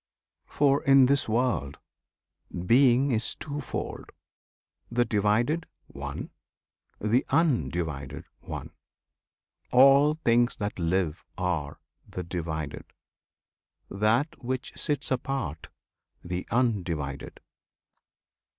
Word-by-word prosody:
[FN#31] - - -23
For 140 -1 +3
in 135 -1 +7
this 140 -2 +2
world 115 - 0 0.9
Being 130 +4 +5
is 115 -1 -1
twofold: 145 -2 -5 0.8
the 120 +1 +2
Divided, 110 +10 +1 0.2
one; - - -7 0.7
The 110 +5 +2
Undivided, 85 - 0
one. - - -7 1.0
All 140 +4 +6
things 120 -5 +2
that 105 -2 -4
live 85 -1 0
Are 85 -6 -2 0.3
"the 90 - -5
Divided." 80 -4 -4 1.1
That 115 +9 0
which 130 +1 -3
sits 145 -1 -2
apart, 125 - -2 0.6
"The 90 +1 -4
Undivided." 90 - -1
115 Hz, 85 wpm, -27 LUFS, 85-135 Hz, 1.1 s, in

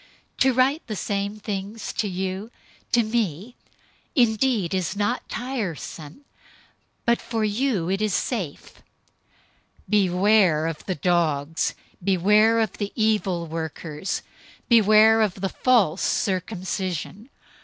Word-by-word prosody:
To 265 - +5
write 260 +5 +1
the 215 - -4
same 200 +1 -3
things 205 +1 -5
to 215 - -1
you, 190 +3 -4 0.4
to 240 -1 +4
me 215 -1 -2 0.6
indeed 230 - +2
is 185 0 -1
not 205 0 -1
tiresome, 215 - -5 0.8
but 235 0 +2
for 225 -2 -2
you 210 -4 0
it 195 +2 -1
is 215 -1 +1
safe. 190 - -4 1.1
003:002 - - -15
Beware 190 -4 +3
of 165 -2 -4
the 185 - -1
dogs, 160 -2 0 0.3
beware 210 +5 +4
of 220 - -2
the 205 -1 -2
evil 210 -6 +1
workers, 160 +1 -4 0.4
beware 220 -1 +6
of 210 -4 +1
the 195 0 -3
false 205 -10 +2
circumcision. 190 - -2
205 Hz, 115 wpm, -24 LUFS, 180-220 Hz, 1.1 s, beware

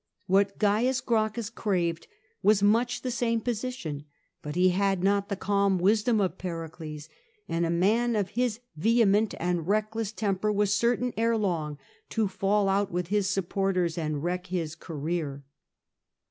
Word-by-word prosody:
What 195 +1 +2
Cains 225 +5 +2
Grauchus 225 -2 -1
craved 170 -7 -1 0.3
was 205 0 +4
much 235 +4 +2
the 255 - -2
same 235 -1 0
position; 220 - -4 0.4
hut 150 +1 -5
he 180 +1 +4
had 195 0 +1
not 200 +1 +2
the 200 - -1
calm 200 0 +1
wisdom 215 +5 +3
of 190 -2 -1
Pericles, 160 -3 -6 0.4
and 170 0 0
a - - -2
man 220 +8 +2
of 200 -3 0
his 240 0 -1
vehement 215 +3 +3
and 175 -1 -1
reckless 215 +1 0
temper 210 -1 -1
was 205 -1 +2
certain 240 +3 +1
ere 230 0 +2
long 165 -8 -1 0.3
to 220 -2 +1
fail 195 +2 +1
out 195 +1 +1
with 175 0 -2
his 205 -2 +1
supporters 195 -3 0
and 155 -3 -2
wreck 180 +1 -2
his 170 -4 -2
career. 155 -3 -4
200 Hz, 150 wpm, -28 LUFS, 175-220 Hz, 0.4 s, was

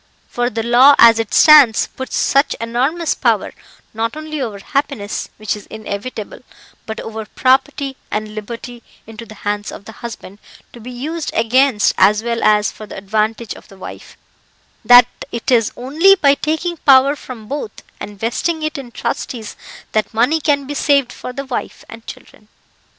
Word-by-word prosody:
For 245 0 -1
the 225 -1 -3
law 250 +5 +6
as 230 -1 +7
it 225 -2 -3
stands 290 -8 +6
puts 260 - -7
such 275 +2 +2
enormous 265 +9 -1
power, - - 0 0.4
not 230 +5 -3
only 310 -1 -5
over 220 -5 -4
happiness 275 -2 -3
(which 215 0 -3
is 210 - -12
inevitable), 215 +1 -7 0.5
but 220 - -5
over 220 0 -6
property 270 +2 0
and 215 0 -4
liberty, 235 +3 -8 0.2
into 225 +1 -11
the 215 - -12
hands 205 0 -2
of 200 - -11
the - - -9
husband, 220 -3 -10 0.3
to 240 - -12
be 235 +2 -10
used 300 +6 -5
against 230 0 +3
as 210 +3 +4
well 235 -1 -2
as 210 -1 +3
for 215 - -11
the - - -9
advantage 215 +3 -2
of - - -15
the 195 - -16
wife, 190 - -11 0.7
that 245 0 +8 0.3
it 235 +2 -3
is 230 -3 +3
only 315 +11 +4
by 285 -7 +4
taking 320 +4 -2
power 275 0 +5
from 245 -6 -10
both, 295 - -6 0.2
and 205 -1 -9
vesting 310 +9 -2
it 310 -1 -3
in 260 -3 -9
trustees, 230 -2 -5 0.4
that 215 0 -1
money 270 +8 +2
can 285 -2 +1
be 290 - -5
saved 280 -2 +1
for 250 - -8
the 275 +2 -6
wife 260 - -6
and 225 0 -13
children. 210 - -12
240 Hz, 170 wpm, -17 LUFS, 220-280 Hz, 0.7 s, that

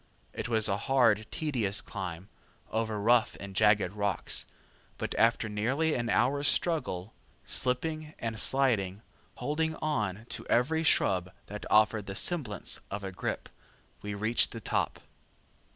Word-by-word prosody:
It - - -4
was 110 -2 +3
a 100 -1 0
hard, 115 -5 +4
tedious 120 -11 -1
climb, 95 -2 -6 0.4
over 110 -1 -1
rough 115 +2 +3
and 100 -1 -8
jagged 105 -3 +4
rocks, 100 -2 -1 0.5
but - - -3
after 115 -1 +2
nearly 130 +10 0
an 120 -2 -1
hour's 140 +6 +2
struggle, 115 - 0 0.3
slipping 155 +5 0
and 115 -1 -4
sliding, 110 -8 +3 0.3
holding 160 +5 -1
on 110 -10 -2
to - - -5
every 160 +7 +2
shrub 95 - +2
that 105 +1 -7
offered 110 -1 +3
the 95 - -5
semblance 135 - 0
of 100 0 -5
a 95 - -4
grip, 90 - -4 0.5
we 105 0 -4
reached 110 +4 +1
the 115 - -6
top. - - -1
110 Hz, 135 wpm, -30 LUFS, 100-130 Hz, 0.5 s, hard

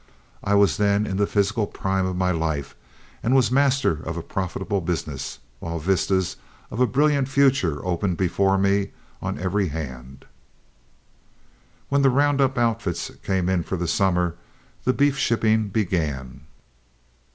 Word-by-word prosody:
I 100 0 +2
was 100 -5 +4
then 100 0 +2
in 95 -2 -3
the 100 0 +2
physical 105 +1 +1
prime 95 -1 -1
of 95 - -3
my 90 0 +1
life 80 -4 -2 0.5
and 125 +4 +2
was 130 -2 +3
master 135 - +2
of 80 0 -5
a 85 - -4
profitable 95 +2 -2
business, 80 -5 -4 0.2
while 85 +3 -4
vistas 95 +2 0 0.3
of 110 - -5
a 125 - +4
brilliant 140 0 +2
future 135 - +2
opened 90 0 -1
before 95 +1 +2
me 100 +1 +1 0.3
on - - -3
every 95 +2 0
hand. 70 -4 -7 1.6
When 140 0 +2
the 135 - +5
round 140 +2 +2
up 135 -1 +1
outfits 115 -7 -1
came 95 -2 0
in 95 -2 +2
for 95 - -4
the 90 0 -2
summer, 90 -1 +1 0.5
the 130 - +3
beef 140 0 +2
shipping 110 -4 +2
began. 75 - -2
95 Hz, 150 wpm, -24 LUFS, 85-115 Hz, 1.6 s, the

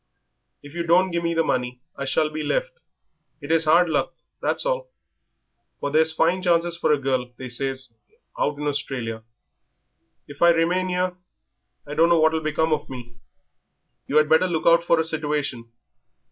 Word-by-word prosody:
"If 145 0 -12
you 170 - -3
don't 175 +3 +3
give 170 0 -2
me 170 0 -1
the 165 - +2
money 125 -3 -2 0.2
I 140 - -5
shall 155 +3 0
be 155 0 -4
left; - - -1 0.7
it 145 0 -6
is 165 0 +4
hard 170 +3 +5
luck, 160 - -1 0.3
that's - - -1
all, - - -2 0.9
for 145 - -3
there's 160 +1 +3
fine 170 +3 +1
chances 170 -1 +2
for 170 - 0
a 150 - +4
girl, 130 -2 -2
they 130 - -7
says, 130 0 -3 0.5
out 145 0 0
in 150 - -5
Australia. 130 -6 -3 1.1
If 145 -1 -13
I 170 - +7
remain 175 +3 +2
'ere 180 0 -1 0.7
I 145 - -7
dunno 165 +2 +4
what 160 0 +4
will 160 0 -1
become 155 +1 0
of 155 - -3
me." 120 -2 -10 0.9
"You 150 - +1
had 155 0 +5
better 160 +4 +4
look 165 -3 -2
out 170 0 +5
for 170 -1 +2
a 160 - +1
situation. 145 -7 -3
160 Hz, 175 wpm, -23 LUFS, 140-170 Hz, 1.1 s, I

